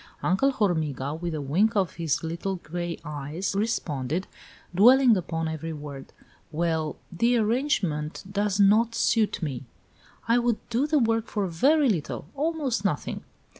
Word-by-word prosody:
Uncle 195 +10 +3
Hormiga, 155 - -1
with 165 +1 -4
a 150 - -3
wink 195 - +2
of 190 -5 0
his 165 -3 -1
little 170 +4 -3
gray 175 0 -5
eyes, 150 +6 -4
responded, 180 - -1 0.5
dwelling 245 +5 +6
upon 165 -3 -2
every 160 +1 -4
word: 145 -2 -8 0.4
"Well, 160 -1 -1 0.2
that 235 +8 +2
arrangement 215 - 0
does 200 0 -1
not 220 +4 +4
suit 220 -5 +1
me." 135 -5 -3 0.6
"I 230 +1 +4
would 240 -2 +1
do 250 +6 +1
the 305 0 +2
work 225 -3 +1
for 205 -2 -1
very 275 - +3
little 170 - -2
almost 285 -7 -1
nothing." 180 -8 -2
190 Hz, 140 wpm, -26 LUFS, 160-230 Hz, 0.6 s, dwelling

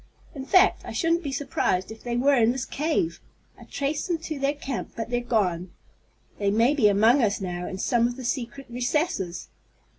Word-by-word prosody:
In 270 -4 -7
fact, 370 +6 +4
I - - -7
shouldn't 335 0 +1
be 285 -5 -4
surprised 250 -8 -1
if 220 - -10
they 240 -1 -2
were 280 +3 +4
in 235 -3 +4
this 260 0 -3
cave. 325 +3 -1 0.3
I - - -14
traced 285 +3 -2
them 345 -2 0
to 310 -2 -6
their 275 +2 0
camp, 270 -3 -5
but 230 +1 -5
they're 245 0 +1
gone. 190 -7 0 0.7
They 200 -1 +1
may 230 +7 +3
be 265 -8 +4
among 220 +7 +4
us 215 -2 +1
now 180 -2 -4
in 190 - -5
some 235 +4 +2
of 240 - -5
the 260 -1 -8
secret 255 +2 -3
recesses!" 245 - -2
245 Hz, 200 wpm, -25 LUFS, 220-285 Hz, 0.7 s, fact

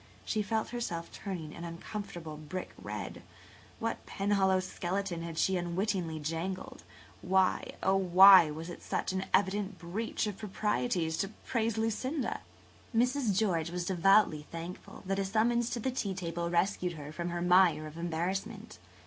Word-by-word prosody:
She 215 - 0
felt 220 +1 -1
herself 175 -9 -4
turning 175 -6 -6
an 170 - -8
uncomfortable 170 -1 -6
brick 155 +4 -6
red. - - -6 0.6
What 230 0 -3
Penhallow 195 -1 +2
skeleton 185 -1 -3
had 165 -1 -6
she 190 +3 +2
unwittingly 175 -1 -1
jangled? 165 +5 -4 0.4
Why, 190 0 +2
oh, 190 0 +4
why, 190 -2 +8
was 160 +2 -6
it - - -9
such - - -2
an 190 0 -1
evident 200 0 +1
breach 180 +9 -3
of 205 -2 -4
the - - -18
proprieties 200 -5 -1
to 195 - 0 0.2
praise 230 -2 0
Lucinda? 235 +5 -1 0.5
Mrs. 245 -3 +2
George 175 -7 +1
was 175 0 -3
devoutly 185 -4 +4
thankful 170 +2 -8
that 195 +1 -1
a - - +1
summons 230 +4 +2
to 240 - -2
the 260 +3 -1
tea 200 -6 -2
table 170 -2 -3
rescued 180 +1 +1
her 150 -2 -8
from 170 +2 -4
her 175 0 -2
mire 180 -3 +5
of 155 0 -9
embarrassment. 190 +6 -3
190 Hz, 155 wpm, -31 LUFS, 170-210 Hz, 0.6 s, why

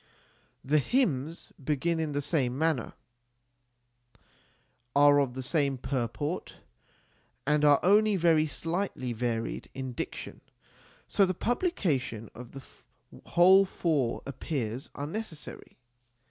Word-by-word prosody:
The 150 +3 +3
hymns 160 - -1
begin 155 +4 0
in 155 -2 -2
the 145 0 -1
same 130 -5 0
manner, 155 -6 0 2.0
are 145 0 +6
of 130 -3 0
the 130 - -4
same 140 -1 0
purport, 135 +6 -3 0.9
and 150 +1 +2
are 145 -1 +6
only 210 +2 +5
very 165 -3 +3
slightly 165 -3 -3
varied 115 -1 -3
in 130 -1 -5
diction, - - -6 0.7
so 200 - +3
the 185 -1 +1
publication 165 - -1
of 125 0 -11
the 135 -1 -9 0.6
whole 185 +3 +6
four 155 -10 -1
appears 130 -3 -4
unnecessary. 160 +2 -7
145 Hz, 105 wpm, -29 LUFS, 130-170 Hz, 2.0 s, are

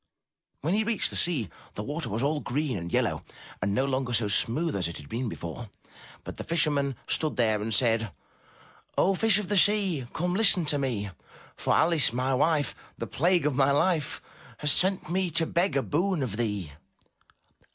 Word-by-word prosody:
When 160 +5 0
he 215 +2 +2
reached 220 -3 -1
the - - -4
sea, 150 - 0 0.3
the 105 - -4
water 145 +1 -3
was 110 +5 -1
all 150 +2 +1
green 145 -1 -2
and 85 -2 -5
yellow - - 0 0.4
and 100 - 0
no 130 - +2
longer 130 -2 -1
so 110 -2 +2
smooth 140 +10 0
as 90 -4 -1
it 85 - -7
had 75 - -11
been 120 - -3
before, 105 +5 -7 0.5
but - - -8
the - - -5
fisherman 145 -5 0
stood 155 -1 -1
there 110 -3 +1
and 110 +2 -3
said: 115 -1 +1 0.9
"O 195 - +3
Fish 215 +1 +4
of 210 -3 -3
the 205 - 0
Sea, 190 - +3
come, 175 +2 -2
listen 185 -4 +5
to 145 -1 +2
me, 110 -8 -2 0.4
For - - 0
Alice, 165 -7 +4
my 130 +3 -1
wife, 145 0 +1 0.2
the - - -4
plague 175 +1 +1
of 150 - +1
my 135 +1 +3
life. 155 +1 +1 0.3
Has 150 -1 +2
sent 190 +4 +2
me 185 0 +1
to 165 +1 +1
beg 170 -1 0
a 135 - +1
boon 170 0 0
of 110 -6 -3
thee." 105 -8 -3
140 Hz, 190 wpm, -27 LUFS, 115-170 Hz, 0.9 s, listen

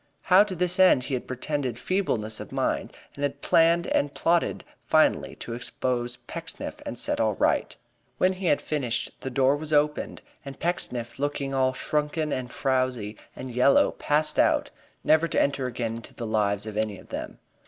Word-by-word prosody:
How 185 +2 +6
to 190 -3 -5
this 180 +1 0
end 185 -9 +6
he 135 - -5
had 125 - -2
pretended 130 -1 -2
feebleness 120 - -1
of - - -8
mind - - -1 0.2
and 140 - -10
had 140 0 -2
planned 170 +1 +4
and 145 - +1
plotted 170 +3 +1 0.2
finally - - +2
to 115 - -6
expose 120 0 -2
Pecksniff - - -7
and - - -4
set - - -1
all - - +2
right. - - +1 0.4
When 185 +1 +3
he 185 -1 -4
had 145 - +2
finished 130 -6 -2
the 130 - -4
door 130 +2 +3
was 155 +1 -5
opened 150 0 +1 0.2
and 135 -1 -9
Pecksniff, 125 -10 -3
looking 140 -1 -2
all 130 -1 +2
shrunken 150 +2 -1
and 125 -1 -4
frowsy 130 -5 -1 0.2
and 130 -1 -7
yellow, 125 +3 +4
passed 150 +1 0
out, - - +3 0.3
never 160 +2 +4
to - - 0
enter 140 -2 +1
again 115 -2 -3
into 115 - -12
the 120 - -5
lives 105 -2 0
of 110 -1 -6
any 110 -2 -1
of - - -16
them. - - -6
135 Hz, 180 wpm, -26 LUFS, 120-155 Hz, 0.4 s, How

